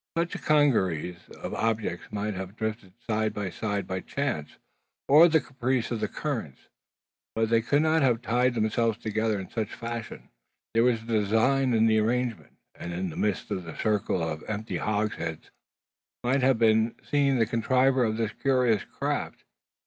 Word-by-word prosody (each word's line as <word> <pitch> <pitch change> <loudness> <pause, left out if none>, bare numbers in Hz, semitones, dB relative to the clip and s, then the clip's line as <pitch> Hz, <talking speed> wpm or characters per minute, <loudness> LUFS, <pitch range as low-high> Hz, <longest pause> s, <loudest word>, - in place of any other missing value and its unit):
Such 170 +1 0
a - - -4
congeries 95 - +1
of - - -7
objects 110 -6 -2
might 105 +1 -2
have 95 +1 -6
drifted 110 -4 -4
side 110 -1 0
by 100 -3 -3
side 100 +1 -2
by 95 0 -3
chance, 130 - -3 0.5
or 155 +5 +8
the 160 -1 +4
caprice 130 -3 -2
of 115 - -1
the - - -1
currents; 115 - -5 0.7
but 115 0 0
they 115 0 +4
could 145 +6 +2
not 160 0 +3
have 120 -3 +2
tied 125 +2 +2
themselves 115 0 +1
together 110 -1 -1
in 95 - -8
such 110 -2 -3
fashion. 115 -1 -6 0.4
There 115 +1 +4
was 120 -3 +2
design 115 +4 +2
in 110 0 +4
the 110 -1 +4
arrangement; 120 +1 -1 0.2
and 85 - -7
in 90 0 -3
the - - -10
midst 105 -3 -1
of 95 - -2
the 80 -1 -9
circle 100 -5 0
of 80 -1 -5
empty 110 +1 -3
hogsheads 105 -7 -2 0.7
might 130 +3 +2
have 130 -1 +4
been 110 0 +3
seen 140 -2 +2
the 115 - +3
contriver 130 +3 +2
of 110 -1 0
this 110 -2 -1
curious 125 -6 +2
craft. - - -4
115 Hz, 170 wpm, -27 LUFS, 105-125 Hz, 0.7 s, or